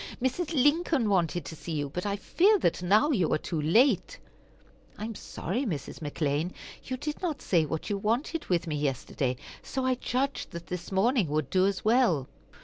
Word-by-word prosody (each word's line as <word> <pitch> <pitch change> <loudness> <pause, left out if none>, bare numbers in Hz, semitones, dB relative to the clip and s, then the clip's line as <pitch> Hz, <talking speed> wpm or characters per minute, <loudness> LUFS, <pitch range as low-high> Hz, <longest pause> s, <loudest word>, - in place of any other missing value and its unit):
Mrs. 260 +7 -1
Lincoln 290 -3 +3
wanted 175 -4 +1
to 160 - -7
see 165 +1 -6
you, 145 -2 -1
but 180 +8 -4
I 200 - 0
fear 385 - +3
that 175 - 0
now 210 - +4
you 185 - +2
are - - +3
too 155 0 -3
late." 210 - +3 0.8
"I 210 - -4
am 225 - -4
sorry, 215 - -3
Mrs. 160 - -4
McClean. 150 +2 -1 0.3
You 255 - -4
did 300 +3 -4
not 335 -6 -2
say 165 -4 +2
what 160 +6 -3
you 200 - 0
wanted 240 +10 -1
with 175 -1 +1
me 155 -3 -2
yesterday, 135 -2 -1 0.3
so 265 -1 -3
I 260 - +3
judged 255 +2 -2
that 170 0 -6
this 180 +2 -6
morning 210 - +3
would 150 -2 -1
do 185 0 +4
as 200 0 -2
well." 215 - +3
195 Hz, 190 wpm, -28 LUFS, 160-255 Hz, 0.8 s, now